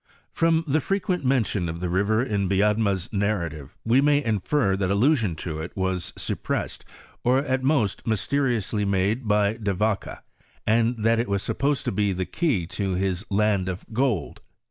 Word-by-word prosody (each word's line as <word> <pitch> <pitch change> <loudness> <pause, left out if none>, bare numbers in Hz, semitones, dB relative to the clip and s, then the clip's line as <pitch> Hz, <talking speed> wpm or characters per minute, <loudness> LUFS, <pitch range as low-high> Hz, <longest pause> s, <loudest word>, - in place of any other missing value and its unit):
From 165 0 +2
the 150 +2 +2
frequent 195 0 -1
mention 110 -9 +1
of 85 +1 -5
the 90 - -2
river 100 +6 +1
in 100 -6 -1
Biedma's 100 -1 +2
nar 100 -3 0
rative 75 -3 -9 0.2
we 120 +4 +4
may 145 0 +3
infer 110 0 +1
that 95 -1 -1
allusion 110 - +2
to 80 0 -5
it 80 +5 -7
was 95 -1 -1
suppressed, - - -3 0.4
or 125 +2 +3
at 130 -1 0
most, 130 -9 0
mysteriously 110 -2 0
made 100 +5 0
by 105 +1 +2
De 100 -4 -1
Vaca, 105 +1 -2 0.4
and 115 0 +2
that 115 +1 +3
it 115 - -1
was 100 -1 0
sup - - -4
posed 140 -2 +1
to - - 0
be 100 0 +1
the 95 0 -2
key 135 - 0
to 95 +2 -2
his 95 0 -1
land 100 -2 +1
of 90 0 -5
gold. 115 - -1
105 Hz, 175 wpm, -25 LUFS, 95-125 Hz, 0.4 s, we